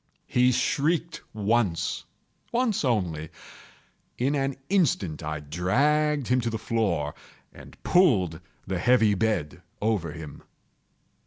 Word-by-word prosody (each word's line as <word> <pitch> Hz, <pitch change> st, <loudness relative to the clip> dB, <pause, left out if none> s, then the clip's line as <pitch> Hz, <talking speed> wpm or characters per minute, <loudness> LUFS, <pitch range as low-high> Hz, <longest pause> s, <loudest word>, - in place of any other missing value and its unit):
He 125 Hz, 0 st, +3 dB
shrieked 160 Hz, +6 st, 0 dB
once—once 120 Hz, -, -1 dB
only. 90 Hz, -, -1 dB, 0.9 s
In 130 Hz, +4 st, +1 dB
an 135 Hz, -1 st, 0 dB
instant 120 Hz, -, +1 dB
I 75 Hz, 0 st, -4 dB
dragged 140 Hz, -, +1 dB
him 125 Hz, 0 st, +2 dB
to 115 Hz, -, -1 dB
the 110 Hz, -, -3 dB
floor, 95 Hz, -11 st, -1 dB, 0.4 s
and -, -, -14 dB
pulled 95 Hz, -, +3 dB, 0.2 s
the 95 Hz, -2 st, -2 dB
heavy 115 Hz, 0 st, +4 dB
bed 100 Hz, -7 st, -1 dB, 0.2 s
over 100 Hz, -7 st, 0 dB
him. 75 Hz, -2 st, -9 dB
110 Hz, 105 wpm, -26 LUFS, 85-140 Hz, 0.9 s, heavy